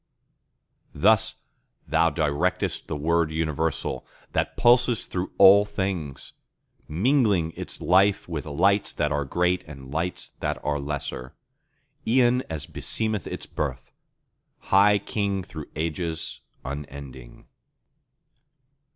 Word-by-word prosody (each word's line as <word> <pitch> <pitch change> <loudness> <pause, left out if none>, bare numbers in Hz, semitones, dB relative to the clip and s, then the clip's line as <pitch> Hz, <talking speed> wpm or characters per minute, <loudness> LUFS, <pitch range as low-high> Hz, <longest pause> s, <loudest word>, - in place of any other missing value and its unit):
Thus 110 +2 +3 0.5
Thou 80 +2 +3
directest 80 +2 -1
the - - -3
Word 85 +2 +1
universal 80 0 -2 0.3
that - - -1
pulses 120 -1 +4
through 90 0 -4
all 100 +2 +8
things, 95 -8 -4 0.5
Mingling 100 - +2
its - - -8
life 100 +1 +3
with 80 -3 -5
Lights 95 +7 +2
that - - 0
are 75 -1 0
great 90 +5 +1
and 70 -3 -10
Lights 85 +3 -2
that - - -2
are 75 0 0
lesser, 70 -1 -5 0.7
E'en 125 +1 +4
as 80 -3 -4
beseemeth 110 -3 -1
its - - -5
birth, 65 -4 -4 0.8
High 100 +1 +6
King 100 -1 -2
through 80 -5 -9
ages 80 +1 -3 0.3
unending. 70 -3 -8
85 Hz, 110 wpm, -25 LUFS, 75-100 Hz, 0.8 s, all